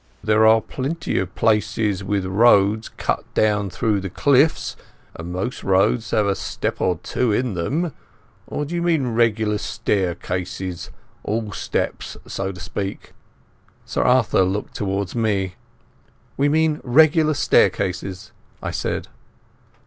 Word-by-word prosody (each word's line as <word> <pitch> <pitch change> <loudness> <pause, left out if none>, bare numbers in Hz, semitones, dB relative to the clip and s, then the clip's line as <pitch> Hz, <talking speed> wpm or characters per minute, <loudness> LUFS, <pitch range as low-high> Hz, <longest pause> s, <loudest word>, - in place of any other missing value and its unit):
There 110 0 +4
are 110 0 +6
plenty 145 - -3
of 90 -1 -4
places 105 -2 +1
with 100 -1 -1
roads 105 +1 +4
cut - - -2
down 105 -2 +2
through 105 +1 0
the 95 0 -5
cliffs, 140 - +2 0.4
and 85 +1 -7
most 95 +8 -4
roads 100 +3 +2
have 105 +1 +2
a 100 - +2
step - - -4
or 90 -3 +1
two 125 -3 0
in 120 +1 0
them. 145 - -1 0.5
Or 150 - -3
do 155 - -7
you 170 - -1
mean 155 -8 +1
regular 110 -2 +2
staircases—all 95 +1 -3
steps, - - -3
so 95 0 -3
to 90 - -11
speak?" 95 +3 -5 0.7
Sir - - -1
Arthur 125 -6 +3
looked 95 +3 -1
towards 100 -2 -2
me. 100 -5 0 0.8
"We 140 +1 +2
mean 155 0 +2
regular 155 +4 +4
staircases," 95 -5 +1 0.3
I - - -4
said. - - -3
105 Hz, 130 wpm, -22 LUFS, 95-125 Hz, 0.8 s, are